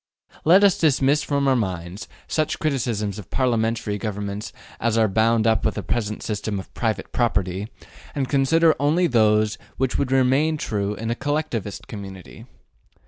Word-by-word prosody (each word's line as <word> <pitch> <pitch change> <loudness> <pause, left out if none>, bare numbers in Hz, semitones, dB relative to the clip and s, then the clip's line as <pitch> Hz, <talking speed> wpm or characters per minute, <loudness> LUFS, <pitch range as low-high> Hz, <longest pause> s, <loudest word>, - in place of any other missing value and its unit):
Let 185 +6 +6
us 200 -3 +4
dismiss 145 -1 +3
from 140 -1 0
our 135 - +4
minds 95 -3 -3 0.2
such 155 0 -1
criticisms 115 - -1
of 100 - -11
parliamentary 115 -4 0
government 105 -1 -4 0.3
as 115 0 +1
are 110 -1 +4
bound 110 +2 +2
up 110 -1 +2
with 110 - 0
the 105 - -4
present 105 +3 -2
system 105 -1 -3
of 95 - -11
private 110 -2 -2
property, 100 -4 0 0.5
and 135 -2 -1
consider 155 +5 +3
only 155 +6 +2
those 110 -5 +2 0.2
which 130 -1 0
would 130 - -1
remain 135 +4 +3
true 105 -6 -2
in 115 +2 -3
a - - 0
collectivist 145 -8 -3
community. 95 - -9
115 Hz, 155 wpm, -23 LUFS, 105-140 Hz, 0.5 s, Let